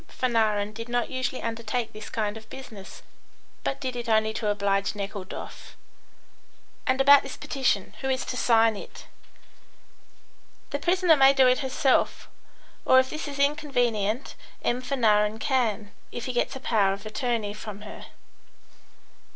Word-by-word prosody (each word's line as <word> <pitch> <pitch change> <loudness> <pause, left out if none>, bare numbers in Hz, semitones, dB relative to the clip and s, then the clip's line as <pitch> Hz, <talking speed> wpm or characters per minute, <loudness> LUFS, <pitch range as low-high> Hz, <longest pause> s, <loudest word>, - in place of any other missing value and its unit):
Fanarin 215 -4 0
did 230 +2 -7
not 245 0 -1
usually 255 0 -3
undertake 230 0 -3
this 215 0 -9
kind 210 -1 -2
of 220 0 -12
business, 220 -7 -10 0.6
but 275 - -2
did 255 -2 -4
it 240 -1 -5
only 220 0 +3
to 220 -1 -3
oblige 200 0 0
Nekhludoff. 200 -1 -7 1.1
"And 260 0 +2
about 280 +1 +8
this 275 - -8
petition. 225 -8 -1
Who 265 - -2
is 260 -1 0
to - - -4
sign 225 -2 +4
it?" - - -10 1.7
"The 285 - -2
prisoner 355 +1 +4
may 270 -1 +6
do 270 -1 +5
it 250 0 +3
herself, 265 0 +1 0.6
or 260 - +5
if 260 0 0
this 310 0 -5
is 285 -1 -6
inconvenient, 255 -6 0 0.3
M. 245 +1 0
Fanarin 220 -5 +2
can, 225 -5 0 0.2
if 240 - -5
he 255 - -3
gets 245 - 0
a - - -6
power 205 -6 +2
of 200 +2 -9
attorney 215 -1 -2
from 210 -1 -8
her." 210 - -10
235 Hz, 150 wpm, -26 LUFS, 210-265 Hz, 1.7 s, about